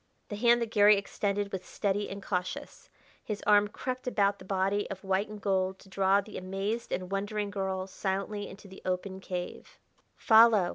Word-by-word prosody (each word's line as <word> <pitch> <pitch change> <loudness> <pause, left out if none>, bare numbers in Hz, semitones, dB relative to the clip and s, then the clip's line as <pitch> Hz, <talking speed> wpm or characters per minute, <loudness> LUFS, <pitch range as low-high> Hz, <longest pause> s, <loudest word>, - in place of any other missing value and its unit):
The 205 - -4
hand 235 +2 +4
that 225 - -6
Garry 205 -1 +6
extended 200 0 -2
was 190 -1 -4
steady 205 0 -1
and 200 0 -7
cautious; 180 -2 -4 0.3
his 210 -2 -4
arm 210 0 +5
crept 255 +4 -5
about 200 -4 +2
the 185 - -12
body 195 +2 0
of 195 0 -7
white 195 +2 0
and 210 0 -8
gold 190 -1 0
to 195 - -18
draw 195 +1 +3
the 210 +1 -8
amazed 195 +5 -3
and 185 +1 -3
wondering 205 +1 -2
girl 190 -2 -2
silently 195 +2 -3
into 200 +1 -12
the 190 0 -12
open 185 +1 -2
cave. 180 -2 -6 0.4
"Follow!" 220 -5 +6
200 Hz, 180 wpm, -30 LUFS, 190-210 Hz, 0.4 s, Garry